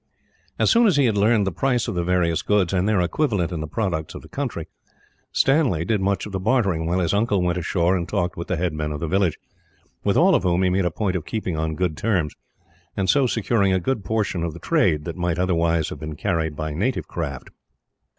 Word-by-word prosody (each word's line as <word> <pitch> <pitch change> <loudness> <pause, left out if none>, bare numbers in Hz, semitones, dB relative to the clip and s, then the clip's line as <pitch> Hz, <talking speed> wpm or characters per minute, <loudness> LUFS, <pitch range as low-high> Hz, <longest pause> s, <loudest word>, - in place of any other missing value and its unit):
As - - +3
soon 235 0 +5
as 185 - +3
he 140 - +4
had 110 -4 +2
learned 105 +1 +3
the 95 - -1
price 125 +4 0
of - - -2
the 85 -1 -1
various 85 -2 +1
goods, 100 -3 +1
and 95 +2 +1
their 105 -4 +2
equivalent 95 - 0
in 85 -3 -3
the 80 - -4
products 85 -5 -3
of - - -8
the - - -12
country, - - -4 0.6
Stanley 135 - +2
did 105 0 0
much 100 0 0
of 105 - -8
the 95 - -2
bartering; 95 -7 +1
while 90 +2 +1
his 90 -2 0
uncle 100 -2 +1
went 90 0 0
ashore 85 +1 +1
and 85 -2 -3
talked 90 +1 -1
with 85 - -6
the 95 - 0
head 85 -1 -1
men 75 0 -3
of 75 - -4
the 85 - -3
village, 95 -1 +1 0.7
with - - +2
all - - +5
of - - +3
whom 90 0 +1
he 90 - +2
made 95 0 +1
a - - +2
point 95 +3 -2
of 90 - -2
keeping 100 -4 -3
on 80 0 -2
good 90 -2 -1
terms, 90 -5 0 0.6
and 95 -2 +3
so 140 -3 +3
securing 115 -3 +1
a 95 - +2
great 110 +3 -2
portion 105 -6 -1
of 85 -2 -3
the 85 - -10
trade 75 -2 +1
that 85 +1 -5
might, 85 -2 -1
otherwise, 85 -3 +1
have - - -7
been 75 +1 -6
carried 80 -3 -1
by 75 0 -4
native 115 - -1
craft. 70 -6 -5
90 Hz, 240 wpm, -23 LUFS, 85-105 Hz, 0.7 s, soon